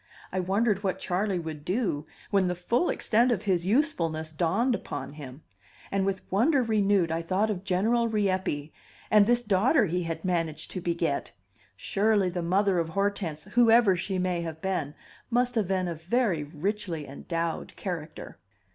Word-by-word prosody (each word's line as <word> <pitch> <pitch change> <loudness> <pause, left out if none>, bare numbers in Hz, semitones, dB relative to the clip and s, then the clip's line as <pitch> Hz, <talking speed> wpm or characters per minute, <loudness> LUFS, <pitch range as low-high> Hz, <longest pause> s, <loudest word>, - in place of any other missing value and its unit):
I 185 - -1
wondered 200 +2 +1
what 190 -2 0
Charley 190 +1 -1
would 160 -3 -6
do, 180 -6 -1 0.2
when 195 -2 +3
the 180 - -1
full 235 - 0
extent 235 +3 +2
of 215 -4 0
his 185 -3 0
usefulness 170 - 0
dawned 190 - +1
upon 145 - -5
him; 140 -1 -10 0.5
and 195 0 +1
with 190 -1 -2
wonder 255 - +3
renewed 200 -6 +2
I 165 +1 -1
thought 195 +6 0
of 190 -2 -4
General 220 +5 +2
Rieppe, 190 -8 -1 0.4
and 210 -1 +6
this 240 0 +3
daughter 220 +6 +3
he 180 0 -1
had 165 0 -4
managed 165 -4 -1
to 185 - -4
beget. 170 - -1 0.4
Surely 200 - +1
the 175 0 -3
mother 190 +2 +2
of 165 -1 -1
Hortense, 195 -5 -2
whoever 230 -1 +5
she 185 +2 -2
may 180 -1 0
have 160 -1 -5
been, 160 -6 -2 0.3
must 245 +1 +1
have 220 -6 0
been 185 -1 0
a 170 - -2
very 175 0 0
richly 170 +2 -3
endowed 165 +4 -4
character! 165 -5 -6
185 Hz, 165 wpm, -27 LUFS, 165-210 Hz, 0.5 s, and